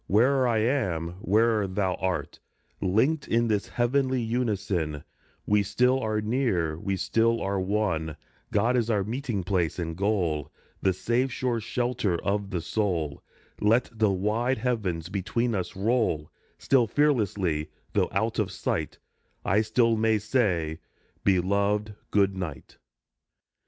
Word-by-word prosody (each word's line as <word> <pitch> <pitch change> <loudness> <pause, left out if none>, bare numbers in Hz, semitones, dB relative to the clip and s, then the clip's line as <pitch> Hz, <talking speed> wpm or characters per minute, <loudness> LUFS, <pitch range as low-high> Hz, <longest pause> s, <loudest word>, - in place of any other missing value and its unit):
Where'er 130 +6 +4
I 115 -2 +2
am, 90 - -1
where'er 110 +1 +2
thou 95 0 0
art, 95 -1 -2 0.4
Linked 120 - +1
in 115 0 +2
this 105 -2 0
heavenly 130 +2 +1
unison 100 - -1 0.4
We 105 0 +3
still 125 +6 +2
are 110 -3 -1
near, 105 - 0
we 100 +2 -1
still 115 +4 +2
are 100 0 -1
one! 95 -6 -1 0.3
God 120 +2 +2
is 120 -2 +1
our 105 -3 +2
meeting 115 -2 -3
place 90 -3 0
and 80 -2 -3
goal, 90 -7 0 0.3
The 95 - +3
safe, 120 +8 0
sure 125 -2 -1
shelter 115 -5 -1
of 100 0 0
the 90 -4 -2
soul. 85 -5 -1 0.4
Let 115 +4 +2
the 110 -2 +2
wide 105 +7 0
heavens 105 -9 -1
between 110 +5 -1
us 95 0 -3
roll; 100 -7 0 0.3
Still 125 -4 +3
fearlessly, 100 - +1 0.2
though - - +2
out - - 0
of - - 0
sight, - - -2 0.5
I 100 +3 +3
still 115 +1 +2
may 110 0 +3
say, 95 -8 0 0.2
" - - -39
Beloved, 100 +3 +1 0.2
good 100 -2 +2
night." 80 -9 -7
105 Hz, 135 wpm, -27 LUFS, 95-115 Hz, 0.5 s, Where'er